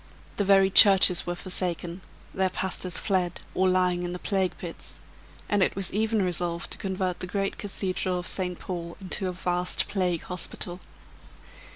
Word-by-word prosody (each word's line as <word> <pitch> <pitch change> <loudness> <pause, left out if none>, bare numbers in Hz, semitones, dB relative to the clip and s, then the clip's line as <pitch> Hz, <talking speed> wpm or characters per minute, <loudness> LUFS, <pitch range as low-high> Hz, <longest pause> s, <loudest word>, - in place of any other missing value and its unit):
The 205 - +1
very 195 -1 +4
churches 190 -3 +7
were 175 - -2
forsaken; 175 -1 -1 0.3
their 190 -1 +1
pastors 185 -1 -1
fled 180 -4 -1
or 190 0 +2
lying 180 -1 +1
in 175 0 -4
the - - -4
plague 190 0 -1
pits; - - -9 0.5
and 205 -1 +1
it - - +1
was 195 -2 -3
even 220 0 +1
resolved 175 -1 -2
to - - -2
convert 185 -2 -3
the 180 - -5
great 195 +1 -3
cathedral 185 -2 -2
of 175 - -5
St. 180 -2 -3
Paul 170 -2 -6
into 190 0 -2
a - - -2
vast 180 0 -1
plague 180 -4 -1
hospital. 180 0 -1
185 Hz, 165 wpm, -26 LUFS, 180-190 Hz, 0.5 s, churches